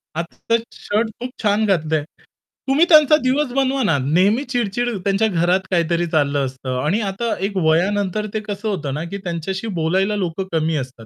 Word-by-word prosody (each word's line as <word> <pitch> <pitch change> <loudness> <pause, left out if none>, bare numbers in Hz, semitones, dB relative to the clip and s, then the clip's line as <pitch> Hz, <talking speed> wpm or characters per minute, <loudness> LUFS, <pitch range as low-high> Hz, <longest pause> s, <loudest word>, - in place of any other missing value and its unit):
आजचा 170 +7 -1 0.2
शर्ट 220 +2 -1
खूप 250 - -4
छान 210 +1 +2
घातलंय." 160 -6 +1 0.7
तुम्ही 290 +5 +5
त्यांचा 305 -2 +7
दिवस 265 +1 +1
बनवा 270 0 +1
ना 160 - +3
नेहमी 190 - +3
चिड-चिड 240 0 0
त्यांच्या 200 +3 +2
घरात 180 -1 +2
काहीतरी 170 -1 +1
चाललं 145 -2 +2
असतं 130 -1 -4
आणि 195 +9 +1
आता 220 +4 -2 0.2
एक 200 - -6
वयानंतर 190 +5 +1
ते 215 - 0
कसं 205 +1 -4
होतं 150 -9 -3
ना, 150 +3 -3
की 195 +4 -5
त्यांच्याशी 180 +5 -3
बोलायला 190 +6 +1
लोकं 185 -1 -3
कमी 160 0 +1
असतात. 125 -3 -16
190 Hz, 170 wpm, -20 LUFS, 160-220 Hz, 0.7 s, त्यांचा